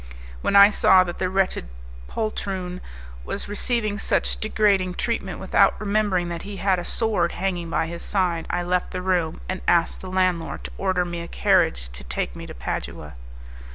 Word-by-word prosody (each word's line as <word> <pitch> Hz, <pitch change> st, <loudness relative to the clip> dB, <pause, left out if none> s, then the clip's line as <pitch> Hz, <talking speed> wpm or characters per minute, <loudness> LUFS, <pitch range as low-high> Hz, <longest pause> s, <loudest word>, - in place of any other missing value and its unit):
When -, -, 0 dB
I 200 Hz, +1 st, +9 dB
saw 190 Hz, -2 st, +5 dB
that 175 Hz, -1 st, -6 dB
the 185 Hz, -, 0 dB
wretched 190 Hz, -, 0 dB, 0.4 s
poltroon 190 Hz, -4 st, -3 dB, 0.4 s
was -, -, -5 dB
receiving 210 Hz, 0 st, 0 dB
such -, -, +1 dB
degrading 200 Hz, -4 st, +1 dB
treatment 210 Hz, -6 st, -2 dB
without 195 Hz, +1 st, +3 dB
remembering 200 Hz, -4 st, +1 dB
that 170 Hz, -1 st, -4 dB
he 200 Hz, 0 st, -7 dB
had 190 Hz, -2 st, +1 dB
a -, -, -4 dB
sword 205 Hz, -5 st, 0 dB
hanging 175 Hz, -2 st, -2 dB
by 165 Hz, -, 0 dB
his 170 Hz, +1 st, -6 dB
side, 180 Hz, -4 st, -1 dB
I 175 Hz, 0 st, -1 dB
left 180 Hz, +1 st, 0 dB
the 185 Hz, -, -4 dB
room, 175 Hz, -3 st, 0 dB
and 185 Hz, 0 st, -3 dB
asked 170 Hz, -1 st, +2 dB
the 185 Hz, -, -7 dB
landlord 185 Hz, -3 st, 0 dB
to -, -, -7 dB
order 185 Hz, -2 st, +1 dB
me 175 Hz, -1 st, -5 dB
a 170 Hz, -, -7 dB
carriage 175 Hz, -, +2 dB
to 60 Hz, +1 st, -11 dB
take -, -, -3 dB
me -, -, -8 dB
to -, -, -9 dB
Padua. 75 Hz, +4 st, -5 dB
185 Hz, 180 wpm, -24 LUFS, 175-200 Hz, 0.4 s, I